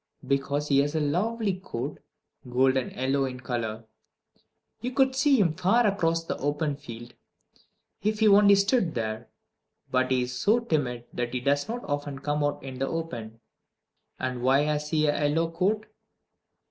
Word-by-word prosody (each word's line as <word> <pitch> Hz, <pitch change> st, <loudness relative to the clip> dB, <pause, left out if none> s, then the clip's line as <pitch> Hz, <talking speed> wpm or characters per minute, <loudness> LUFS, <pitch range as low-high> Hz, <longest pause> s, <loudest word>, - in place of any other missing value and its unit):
Because 140 Hz, +2 st, 0 dB
he 140 Hz, -1 st, +4 dB
has 145 Hz, +2 st, +1 dB
a -, -, +2 dB
lovely 195 Hz, +6 st, 0 dB
coat, 125 Hz, -11 st, -5 dB, 0.5 s
golden 130 Hz, +1 st, +2 dB
yellow 135 Hz, +1 st, 0 dB
in 125 Hz, -1 st, -5 dB
color. 115 Hz, -3 st, -4 dB, 0.9 s
You 250 Hz, +1 st, -4 dB
could 265 Hz, -1 st, +3 dB
see 275 Hz, -1 st, +4 dB
him 170 Hz, -6 st, +3 dB
far 190 Hz, +8 st, +3 dB
across 165 Hz, -5 st, +1 dB
the -, -, -4 dB
open 145 Hz, +1 st, -1 dB
field, 120 Hz, -3 st, -10 dB, 0.9 s
if 215 Hz, +2 st, 0 dB
he 220 Hz, 0 st, +4 dB
only 200 Hz, 0 st, +7 dB
stood 200 Hz, -3 st, +2 dB
there. 110 Hz, 0 st, -3 dB, 0.6 s
But 130 Hz, 0 st, +2 dB
he 130 Hz, -1 st, +2 dB
is 125 Hz, 0 st, -5 dB
so 215 Hz, -, +3 dB
timid 130 Hz, -, -2 dB
that 120 Hz, 0 st, -3 dB
he -, -, +1 dB
does 140 Hz, +7 st, 0 dB
not 240 Hz, +1 st, -4 dB
often 145 Hz, -1 st, -3 dB
come 145 Hz, +1 st, -1 dB
out 145 Hz, -1 st, -1 dB
in 130 Hz, -1 st, -7 dB
the 135 Hz, -, 0 dB
open. 115 Hz, -9 st, -5 dB, 0.8 s
And 125 Hz, -1 st, -3 dB
why 135 Hz, +3 st, +4 dB
has 150 Hz, 0 st, -1 dB
he 155 Hz, -1 st, +2 dB
a 145 Hz, 0 st, +2 dB
yellow 165 Hz, +3 st, 0 dB
coat? 200 Hz, +6 st, 0 dB
145 Hz, 165 wpm, -27 LUFS, 130-185 Hz, 0.9 s, only